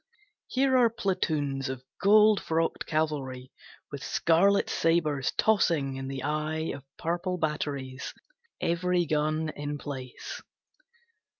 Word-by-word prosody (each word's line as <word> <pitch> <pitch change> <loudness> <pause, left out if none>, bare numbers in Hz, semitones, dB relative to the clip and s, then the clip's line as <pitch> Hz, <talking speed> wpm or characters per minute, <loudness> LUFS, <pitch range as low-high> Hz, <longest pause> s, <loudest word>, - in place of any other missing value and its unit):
Here 265 0 +2
are 240 -2 +5
platoons 155 - -1
of 130 -1 -5 0.2
gold 210 +1 +6
frocked 165 0 -1
cavalry, 140 -5 -2 0.4
With 140 -1 -6
scarlet 195 +8 +3
sabres 155 -5 +1
tossing 165 -11 +2
in 135 0 -5
the 135 -1 -5
eye 155 +2 -1
Of 140 - -8
purple 175 +2 -2
batteries, 140 -4 -3 0.5
every 175 +1 +1
gun 155 +1 0
in 145 -1 -4
place. 130 -4 -7
155 Hz, 110 wpm, -28 LUFS, 140-175 Hz, 0.5 s, gold